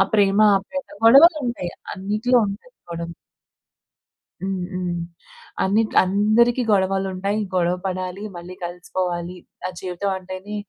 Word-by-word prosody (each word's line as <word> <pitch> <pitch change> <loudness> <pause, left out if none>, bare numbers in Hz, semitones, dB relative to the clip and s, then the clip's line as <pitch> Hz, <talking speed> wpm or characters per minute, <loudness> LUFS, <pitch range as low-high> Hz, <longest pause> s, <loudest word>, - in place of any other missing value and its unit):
ప్రేమ 200 0 +3 0.2
ఆప్యాయత, 275 +8 -7 0.2
గొడవలు 305 +8 +8
ఉంటాయి. 210 -8 -3 0.2
అన్నిటిలో 210 +6 +1
ఉంటాయి 200 - -8 0.2
గొడవలు. 170 0 -5 1.3
హ్మ్. 190 -1 -2
హ్మ్. 180 -1 -2 0.7
అన్ని 205 +4 +3 0.2
అందరికి 215 +6 +3
గొడవలు 195 -1 +2
ఉంటాయి 195 +3 -1 0.2
గొడవ 175 -1 +2
పడాలి, 185 +1 -3
మళ్ళీ 175 +1 -9
కలిసిపోవాలి. 175 0 -3 0.3
ఆహ్, 185 - -6
జీవితం 185 +2 -3
అంటేనే 185 +2 -7
190 Hz, 110 wpm, -22 LUFS, 180-210 Hz, 1.3 s, గొడవలు